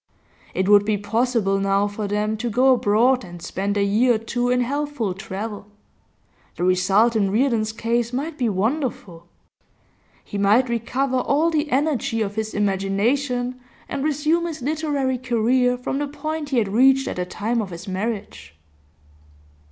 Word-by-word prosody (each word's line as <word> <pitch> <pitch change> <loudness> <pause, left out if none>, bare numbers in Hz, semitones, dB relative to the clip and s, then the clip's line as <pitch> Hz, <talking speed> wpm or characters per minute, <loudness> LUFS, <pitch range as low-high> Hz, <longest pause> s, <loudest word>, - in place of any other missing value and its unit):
It 190 - 0
would 205 0 +6
be 210 0 0
possible 210 -1 0
now 195 +1 +1
for 205 0 -4
them 210 +1 -1
to 240 +2 -3
go 255 +4 +4
abroad 245 +3 +2
and 175 -1 -10
spend 200 +4 -3
a 200 - +2
year 225 +5 +3
or - - +1
two 245 +2 -2
in 250 0 +2
healthful 280 -5 -2
travel; 205 +1 -6 0.9
the - - -4
result 195 +5 +3
in 200 -3 +2
Reardon's 220 0 +1
case 230 +1 -1
might 290 +5 -3
be 245 -5 0
wonderful. 205 - -2 1.0
He 205 - -6
might 215 +6 +3
recover 255 +3 -1
all 290 +6 +1
the 300 -1 0
energy 270 -5 0
of 200 -1 -4
his 220 0 -4
imagination, 235 +6 0 0.3
and 275 -1 -3
resume 310 +3 +1
his 310 -6 -6
literary 285 -3 -1
career 250 +1 +1
from 255 +2 -3
the 290 - -1
point 300 +1 -5
he 265 - 0
had 215 -4 +1
reached 265 +5 +4
at - - -4
the 180 - -1
time 225 +5 -1
of 205 - -5
his 175 +3 -9
marriage. 190 - -5
230 Hz, 160 wpm, -22 LUFS, 205-265 Hz, 1.0 s, would